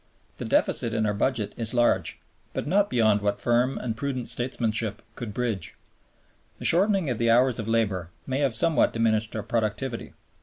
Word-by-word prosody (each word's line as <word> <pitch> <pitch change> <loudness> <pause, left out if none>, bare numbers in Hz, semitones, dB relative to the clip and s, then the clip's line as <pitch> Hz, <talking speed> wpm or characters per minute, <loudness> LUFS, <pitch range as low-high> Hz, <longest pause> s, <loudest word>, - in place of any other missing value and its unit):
The - - -5
deficit 115 -1 +1
in 110 -1 +1
our 105 - +1
Budget 110 +1 -1
is 115 +1 -1
large, 120 -1 +1 0.3
but - - -3
not 200 +6 +2
beyond 110 -4 +3
what 100 0 -1
firm 120 +4 +1
and 115 -3 -3
prudent 125 -2 -3
statesmanship 115 -3 0
could 120 -3 -6
bridge. 110 -5 -3 0.8
The - - -8
shortening 190 -4 +3
of 120 - -3
the 115 0 +2
hours 125 +1 +4
of 110 - -4
labor 100 -7 0 0.2
may 130 +1 -2
have 135 -5 +1
somewhat 155 +8 +2
diminished 110 -1 0
our 110 - -3
productivity. 115 +2 -3
115 Hz, 175 wpm, -26 LUFS, 110-130 Hz, 0.8 s, hours